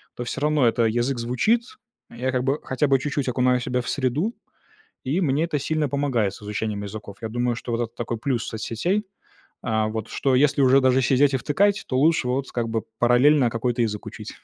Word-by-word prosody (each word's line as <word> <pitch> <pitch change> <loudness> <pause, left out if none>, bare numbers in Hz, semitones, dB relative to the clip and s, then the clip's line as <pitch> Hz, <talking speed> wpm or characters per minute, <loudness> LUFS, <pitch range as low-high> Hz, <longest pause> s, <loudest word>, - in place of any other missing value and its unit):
то 120 - -4
всё 120 - -4
равно 150 -3 +2
это 115 0 +2
язык 120 +3 0
звучит. 125 - +1 0.5
А - - -14
я 130 +2 -1
как 125 0 0
бы 140 +3 +1
хотя 130 +3 0
бы 135 - +4
чуть-чуть 140 0 -2
окунаю 125 0 +2
себя 125 0 -1
в - - -6
среду, 145 - -1 0.7
и 145 +8 0
мне 150 +1 +1
это 155 -3 -2
сильно 155 0 -1
помогает 125 -8 0
с - - -14
изучением 105 0 -3
языков. 100 -1 -8
Я 110 - -4
думаю, 120 +1 -1
что 120 - -6
вот 115 +1 0
это 115 +1 -4
такой 120 -1 -3
плюс 125 -1 -2
соцсетей, 125 - -2 0.6
а, 110 -1 0
вот, 110 0 -4
что 135 -2 0
если 140 +1 +3
уже 130 +1 +6
даже 130 0 +3
сидеть 135 +2 +3
и - - +4
втыкать, 195 +10 +1
то 130 - -1
лучше 155 -3 +3
вот, 130 +2 -2
как 115 -2 -2
бы, 115 -1 -1 0.2
параллельно 125 +2 +4
какой-то 120 +1 -1
язык 105 -2 -2
учить, - - -8
125 Hz, 210 wpm, -23 LUFS, 115-140 Hz, 0.7 s, уже